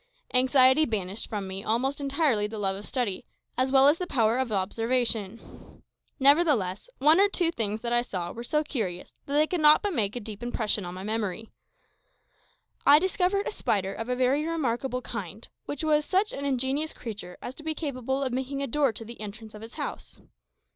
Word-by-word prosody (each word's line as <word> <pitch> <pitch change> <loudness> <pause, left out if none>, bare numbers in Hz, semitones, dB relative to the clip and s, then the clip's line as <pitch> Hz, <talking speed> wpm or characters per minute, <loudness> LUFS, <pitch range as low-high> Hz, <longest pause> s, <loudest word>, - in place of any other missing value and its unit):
Anxiety 260 +3 +5
banished 205 -3 -3
from 205 -3 -4
me 190 +1 -5
almost 265 +6 0
entirely 275 -7 +1
the 220 +1 -7
love 195 -2 0
of 200 +2 -8
study, 240 -7 -2 0.3
as 260 +1 +1
well 270 0 +6
as 295 +3 +4
the 360 - -3
power 230 -3 +2
of 260 -3 -1
observation. 225 +1 -2 0.4
Nevertheless, 275 - +3
one 305 +5 +5
or 405 +1 +5
two 350 -4 +1
things 220 -7 -2
that 235 0 -2
I 240 - +4
saw 185 -8 -4
were 235 - -7
so 300 +5 0
curious 205 -12 -4
that 280 - -4
they 300 +1 +5
could 345 +1 -2
not 300 +4 +6
but 410 -2 -1
make 210 -6 -1
a - - -2
deep 215 -1 -8
impression 220 -4 0
on 175 +1 -6
my 185 - -7
memory. 220 0 -3 1.3
I 285 - +8
discovered 375 +3 +1
a - - -2
spider 195 - -1
of 225 +2 -6
a 250 - +1
very 260 +4 +2
remarkable 265 -5 -2
kind, - - -6 0.2
which 290 +1 -5
was 300 -1 +3
such 390 +6 +1
an 280 - -4
ingenious 275 +3 0
creature 200 -6 -8
as 245 - -7
to 300 - -11
be 315 0 -2
capable 270 -3 -2
of 260 -2 -2
making 270 +2 -2
a - - -2
door 280 +1 +2
to 225 - -7
the 235 0 -10
entrance 215 +1 -8
of 210 - -10
its 225 +1 -10
house. - - -6
250 Hz, 200 wpm, -27 LUFS, 215-290 Hz, 1.3 s, I